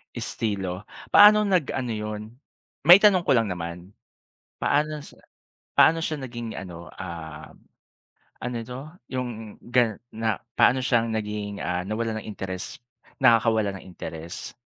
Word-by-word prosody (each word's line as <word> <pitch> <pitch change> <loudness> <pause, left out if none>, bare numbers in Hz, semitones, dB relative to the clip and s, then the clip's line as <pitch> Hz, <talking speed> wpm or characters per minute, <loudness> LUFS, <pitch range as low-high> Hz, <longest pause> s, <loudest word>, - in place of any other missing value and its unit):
Estilo. 95 -3 -3 0.2
Paano 210 +1 +8
nag-ano 140 - 0
'yon? 105 -1 -4 0.7
Maitanong 185 0 +8
ko - - +4
lang 115 -2 +2
naman. 85 +2 -6 0.7
Paano 150 0 0
sa - - -15 0.5
paano 165 +1 +5
siya 155 -3 -3
naging 120 -3 -6
ano, 85 -3 -9
ah, 80 -4 -8 0.9
ano 125 0 -4
'to? 125 +3 -7 0.3
Yung 120 -4 -5
gan 120 -4 +2 0.2
na 110 -1 -1 0.2
paano 130 +1 +4
siyang 115 -3 +2
naging, 105 -2 -3
ah, 90 0 -1
nawalan 110 0 -2
ng - - -12
interes 95 -2 -6 0.4
nakakawala 110 -5 +4
ng - - -14
interes? 85 -2 -8
110 Hz, 125 wpm, -25 LUFS, 95-125 Hz, 0.9 s, Paano